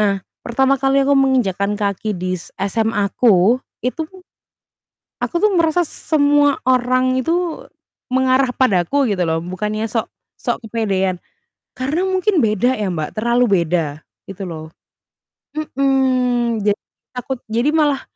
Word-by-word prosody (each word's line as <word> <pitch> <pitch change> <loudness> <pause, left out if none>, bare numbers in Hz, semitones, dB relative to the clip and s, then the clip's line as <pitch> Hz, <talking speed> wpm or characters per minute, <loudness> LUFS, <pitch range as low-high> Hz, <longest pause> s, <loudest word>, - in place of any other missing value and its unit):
Nah, 200 -2 +2 0.2
pertama 265 +3 +1
kali 270 0 +3
aku 280 - +2
menginjakkan 230 -8 +2
kaki 205 0 -2
di 185 +1 -3
s - - -12
SMA-ku, 210 +1 +2 0.2
itu 310 +5 -2 1.2
aku - - -3
tuh 425 - +5
merasa 335 +1 +3
semua 290 -2 +2
orang 255 0 +2
itu 335 +4 -1 0.5
mengarah 260 -1 +2
padaku 245 +3 +2
gitu 185 -3 0
loh, 160 0 0
bukannya 210 +5 -3
sok 225 0 -1 0.3
sok - - -2
kepedean. 195 -5 0 0.6
Karena 290 +8 -1
mungkin 375 - +1
beda 220 +4 +1
ya, 205 -3 -2
Mbak, 155 +2 -4
terlalu 235 +3 +2 0.2
beda 155 -3 -2 0.3
gitu 195 0 -6
loh. 160 -3 -7 0.9
Mhm, 255 -6 +1
jadi 205 0 +2 0.3
takut 255 +1 -4
jadi 235 +6 +1
malah, 300 -3 +2
245 Hz, 125 wpm, -19 LUFS, 200-275 Hz, 1.2 s, tuh